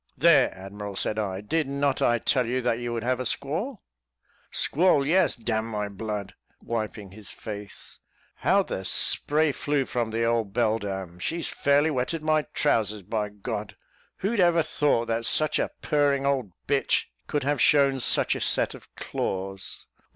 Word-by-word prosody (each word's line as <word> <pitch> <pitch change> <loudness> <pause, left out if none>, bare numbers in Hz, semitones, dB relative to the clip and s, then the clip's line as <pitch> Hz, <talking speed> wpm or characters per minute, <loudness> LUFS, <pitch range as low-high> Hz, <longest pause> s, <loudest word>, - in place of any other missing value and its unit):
"There, - - +5
admiral," 100 +1 -7
said 105 +3 0
I, 95 -2 -3
"did 155 +8 -1
not 140 0 0
I 120 - +3
tell 125 +1 +1
you 125 +2 0
that 120 -1 +1
you 120 0 -3
would 115 -1 -3
have 130 +1 0
a - - -1
squall?" 175 - -3 0.7
"Squall! 155 -3 +3
yes 180 +4 +3
d 115 -1 -4
n 110 0 0
my 105 -2 -3
blood," 100 -1 -5 0.3
wiping 110 -4 -4
his 105 0 -12
face; 105 -2 -8 0.4
"how - - +3
the - - -5
spray 155 +1 +2
flew 145 -1 -1
from 120 -3 -2
the 115 +1 -1
old 115 -3 0
beldam! 100 -6 -1
She's 165 - -2
fairly 145 +2 +2
wetted 145 +4 -2
my 155 -1 +1
trousers, 110 -7 +1
by 105 +2 -2
God. 105 0 -6 0.5
Who'd 220 +2 0
ever 170 -2 +4
thought 145 -6 +1
that 115 0 -1
such 155 0 +2
a - - 0
purring 145 -2 +2
old 135 -8 0
b 140 - +2
h - - 0 0.2
could 145 -2 -1
have 145 -1 0
shown 140 -2 +4
such - - +4
a - - -5
set - - +2
of - - -13
claws! 95 0 -4
120 Hz, 170 wpm, -26 LUFS, 105-145 Hz, 0.7 s, There